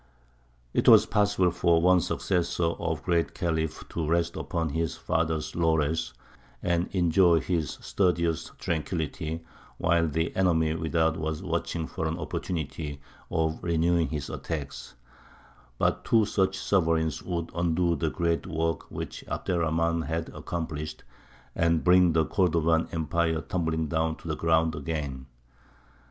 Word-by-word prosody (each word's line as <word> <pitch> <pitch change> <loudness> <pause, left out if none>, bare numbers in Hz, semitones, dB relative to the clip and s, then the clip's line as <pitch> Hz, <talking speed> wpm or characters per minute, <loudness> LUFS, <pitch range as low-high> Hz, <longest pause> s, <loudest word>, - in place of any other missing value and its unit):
It - - +1
was - - +8
possible 100 -3 +2
for 85 -1 +3
one 90 +1 +5
successor 90 0 -1
of 80 -1 -1
the - - -18
Great 85 -2 0
Khalif 80 -2 -2
to 80 -2 -3
rest 85 0 +1
upon 80 -1 -2
his 80 +2 -1
father's 80 -1 -1
laurels, 80 -1 +1 0.5
and 85 0 +1
enjoy 85 -2 +4
his 80 -5 -2
studious 85 -4 0
tranquillity, 80 0 -3 0.3
while 85 -1 +2
the 80 +2 -1
enemy 80 -4 +2
without 80 0 +1
was 80 -1 -3
watching 80 -2 -2
for 80 - -3
an 80 +1 -2
opportunity 75 -3 -4 0.3
of 80 -1 0
renewing 85 0 +2
his 75 -3 -4
attacks; 75 -6 -5 0.8
but - - +1
two 110 -2 +4
such 95 -1 +1
sovereigns 80 -5 +1
would 85 -2 -3
undo 85 0 +1
the 80 - -1
great 85 +1 -1
work 80 -2 -2
which - - -6
Abd - - -3
er 90 - +1
Rahmān 80 -1 0
had 80 +1 -2
accomplished, 75 -2 -5 0.5
and 85 -1 +2
bring 90 -1 +5
the 80 -1 +3
Cordovan 85 -3 +2
empire 80 0 0
tumbling 80 -5 -1
down 80 0 0
to - - -12
the 80 - -1
ground 80 0 +2
again. 70 -4 -4
80 Hz, 140 wpm, -27 LUFS, 80-85 Hz, 0.8 s, was